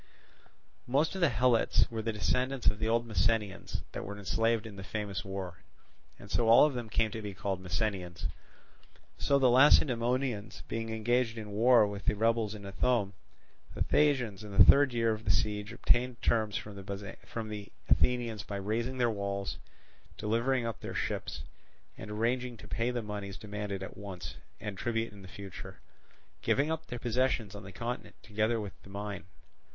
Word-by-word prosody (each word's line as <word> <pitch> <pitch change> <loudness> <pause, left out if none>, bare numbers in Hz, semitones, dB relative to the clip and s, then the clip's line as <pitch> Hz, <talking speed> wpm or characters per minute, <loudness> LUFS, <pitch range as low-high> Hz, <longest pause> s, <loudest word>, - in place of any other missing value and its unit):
Most 140 +8 +2
of 190 - -4
the 170 - +5
Helots 120 -1 +3
were 110 -1 -2
the 115 +1 -1
descendants 125 +5 0
of 105 - +3
the 110 - 0
old 115 +1 +2
Messenians 105 -1 0
that - - -5
were 100 +1 -6
enslaved 115 +3 +1
in 110 -3 -8
the 95 - -7
famous 105 -1 -3
war; 95 -5 -5 0.6
and 100 - -12
so 115 - +2
all 115 +5 +9
of 150 - +1
them 120 -3 -4
came 110 0 +1
to 115 - -5
be 100 -2 -6
called 95 -1 -2
Messenians. 90 -1 -2 0.9
So 140 - +3
the 130 -3 +5
Lacedaemonians 125 -3 +3
being 115 0 -3
engaged 115 +1 +1
in 110 -2 -6
a - - -8
war 115 +2 +6
with 100 0 -5
the - - +2
rebels 110 0 +1
in 100 -1 -9
Ithome, 100 +1 +1 0.6
the - - +1
Thasians 125 -9 +2
in 100 -2 -7
the - - +11
third 140 -1 +7
year 115 -1 +2
of 110 0 -3
the - - -2
siege 105 +3 +1
obtained 120 +1 +2
terms 110 -2 +2
from 105 - -7 0.8
the 105 -1 -6 0.2
Athenians 120 -4 +2
by 100 0 -6
razing 115 +6 -2
their 120 -2 +3
walls, 100 -1 -3 0.6
delivering 115 +4 +1
up 115 -2 -3
their - - -6
ships, 70 - -3 0.5
and 105 - -9
arranging 120 +3 -1
to - - -12
pay 115 +1 0
the 120 -2 -2
moneys 100 -2 -5
demanded 105 -2 -4
at - - -7
once, 95 -3 -7 0.2
and 100 -3 -5
tribute 115 -2 -1
in 100 -2 -11
future; 95 0 -9 0.6
giving 145 +3 +2
up 160 0 -3
their 120 - -5
possessions 120 -3 0
on 100 - -7
the 100 -1 -10
continent 120 +4 -5
together 110 +2 0
with 100 -2 -5
the - - -15
mine. 100 -3 -5
110 Hz, 175 wpm, -31 LUFS, 100-120 Hz, 0.9 s, the